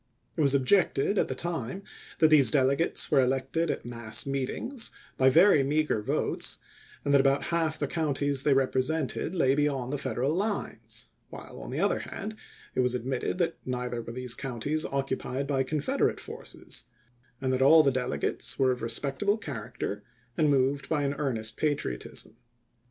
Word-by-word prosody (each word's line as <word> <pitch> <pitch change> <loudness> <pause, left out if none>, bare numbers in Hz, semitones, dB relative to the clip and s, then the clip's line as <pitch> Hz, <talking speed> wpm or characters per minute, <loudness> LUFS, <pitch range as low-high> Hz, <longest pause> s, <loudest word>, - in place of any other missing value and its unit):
It 160 - 0
was 140 -2 +4
objected, 155 +5 +2
at - - +2
the - - -3
time, 170 - -3 0.3
that 160 - +5
these 145 -6 +6
delegates 140 +5 +2
were - - +5
elected 135 +6 0
at - - -3
mass 115 -2 -2
meetings 140 - -2 0.3
by 130 0 +5
very 165 +2 +6
meager 145 -4 +1
votes, - - -1 0.5
and 140 - +2
that 140 - +7
about 135 +1 +2
half 160 -2 +1
the 145 - -1
coun 150 -1 -1
ties 140 -1 +1
they 140 -1 +3
represented 135 +5 0
lay 135 -6 +3
beyond 140 -3 0
the 145 - -1
Federal 130 +3 -1
lines; 205 +4 -3 0.2
while, - - -10
on - - -8
the - - -3
other - - +2
hand, 220 0 -6 0.4
it - - -3
was 125 0 +2
admitted 125 +5 -2
that 175 -2 0
neither 125 -1 -3
were 115 - -8
these 125 -1 -1
counties 135 +5 -2
occupied 135 0 -2
by 140 -1 0
Confederate 145 +2 0
forces, - - -6 0.5
and 130 -1 0
that 130 - 0
all 155 +4 +7
the 140 - +3
delegates 130 -1 -1
were 130 -1 +3
of 125 - -3
respectable 135 - 0
char 140 - -6
acter 105 +1 -4 0.3
and 155 -2 +3
moved 140 0 +1
by 150 -2 +1
an 140 0 0
earnest 110 -6 -1
patriotism. 145 - -2
135 Hz, 170 wpm, -28 LUFS, 130-155 Hz, 0.5 s, that